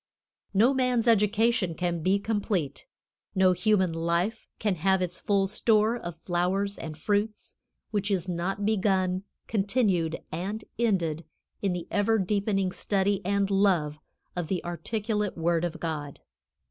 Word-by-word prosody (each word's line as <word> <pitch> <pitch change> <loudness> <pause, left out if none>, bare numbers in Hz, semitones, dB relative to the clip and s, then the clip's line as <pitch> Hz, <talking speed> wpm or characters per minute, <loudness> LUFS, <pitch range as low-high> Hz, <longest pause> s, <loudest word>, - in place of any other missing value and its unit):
No 235 +7 +5
man's 250 -3 +1
education 210 -3 +3
can 175 -1 -1
be 190 +4 +3
complete, 200 -8 -2 0.5
no 190 -1 +5
human 185 -1 +2
life 170 +6 -1
can 210 -2 0
have 190 +4 +2
its 180 -1 -3
full 200 -1 +2
store 215 +2 +2
of 175 -8 -6
flowers 185 +4 -1
and 155 -1 -6
fruits, 210 +5 -1 0.4
which 205 -1 -1
is 190 -3 0
not 185 +3 -2
begun, 190 -3 +1 0.2
continued 195 -6 +1
and 195 +7 -4
ended 170 -9 +1 0.4
in 195 -3 +1
the 175 -1 -5
ever 205 +2 +2
deepening 195 -1 0
study 200 +1 0
and 200 +1 +1
love 180 -7 +2 0.4
of 175 -3 -2
the 180 0 -2
articulate 210 +3 -2
word 165 0 +1
of 175 -1 -3
God. 150 -4 -4
195 Hz, 135 wpm, -27 LUFS, 175-210 Hz, 0.5 s, No